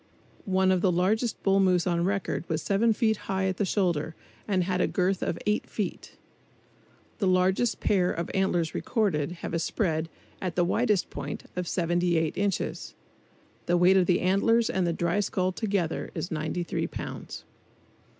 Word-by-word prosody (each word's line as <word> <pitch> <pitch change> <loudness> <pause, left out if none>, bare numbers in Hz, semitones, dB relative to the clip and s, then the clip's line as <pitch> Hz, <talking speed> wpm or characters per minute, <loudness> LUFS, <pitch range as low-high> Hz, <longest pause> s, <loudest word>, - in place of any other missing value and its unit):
One 190 0 +3
of 185 -1 +2
the 185 - +3
largest 205 +6 0
bull 195 0 +3
moose 185 -3 +3
on 170 -1 +1
record 195 -1 -1
was 160 -2 -1
seven 205 +6 +2
feet 220 -1 +1
high 190 0 0
at 190 -1 -1
the 205 - +1
shoulders 170 -5 0 0.3
and 190 -3 +1
had 180 0 0
a - - +3
girth 185 +1 0
of 170 - -1
eight 210 +1 0
feet. 210 -4 -5 1.0
The 200 - +1
largest 185 +5 +2
pair 180 -3 +2
of 170 0 -4
antlers 175 -4 +1
recorded 175 - 0
have - - -4
a 165 - +1
spread, 165 -2 -1 0.3
at 180 -3 -3
the 175 - +3
widest 210 0 +1
point, - - -5
of 180 -1 -3
78 170 -2 +1
inches. 200 -2 -2 0.7
The 175 - +3
weight 180 +2 +5
of 185 -2 +4
the 180 - +3
antlers 225 +5 +3
and 185 -2 0
the - - +1
dry 170 +3 0
skull 185 -2 0
together 195 -5 -2
is 175 - -4
93 160 +2 -2
pounds. - - -7
185 Hz, 170 wpm, -27 LUFS, 175-195 Hz, 1.0 s, weight